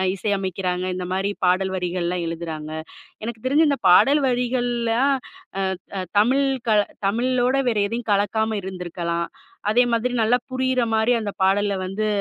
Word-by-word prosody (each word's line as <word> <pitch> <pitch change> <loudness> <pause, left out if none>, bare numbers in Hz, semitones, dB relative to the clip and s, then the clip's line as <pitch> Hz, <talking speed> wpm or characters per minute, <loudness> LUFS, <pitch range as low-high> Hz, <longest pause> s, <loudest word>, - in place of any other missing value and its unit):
இசையமைக்கிறாங்க, 190 -2 -2
இந்த 180 0 -4
மாரி 195 +2 0
பாடல் 185 +1 +2
வரிகள்லாம் 180 -1 -2
எழுதுறாங்க. 165 -2 -5 0.6
எனக்கு 225 -1 -6
தெரிஞ்சு 295 +5 +4
இந்த 280 - 0
பாடல் 280 +11 +6
வரிகள்லாம் 245 +1 +1 0.8
ஆ - - -1
ஆ - - -2 0.2
தமிழ் 260 +6 +3 0.2
க - - +4 0.4
தமிழோட 250 +4 +1
வேற 225 - -1
எதையும் 230 +1 -4
கலக்காம 215 +2 +1
இருந்திருக்கலாம். 175 -2 -3 0.4
அதே 245 +3 +5
மாதிரி 240 +2 0
நல்லா 235 +3 +3
புரியிற 260 0 +1
மாரி 220 +3 +3
அந்த 205 -2 -4
பாடல்ல 200 +1 +2
வந்து 210 +3 -2
215 Hz, 140 wpm, -22 LUFS, 185-245 Hz, 0.8 s, பாடல்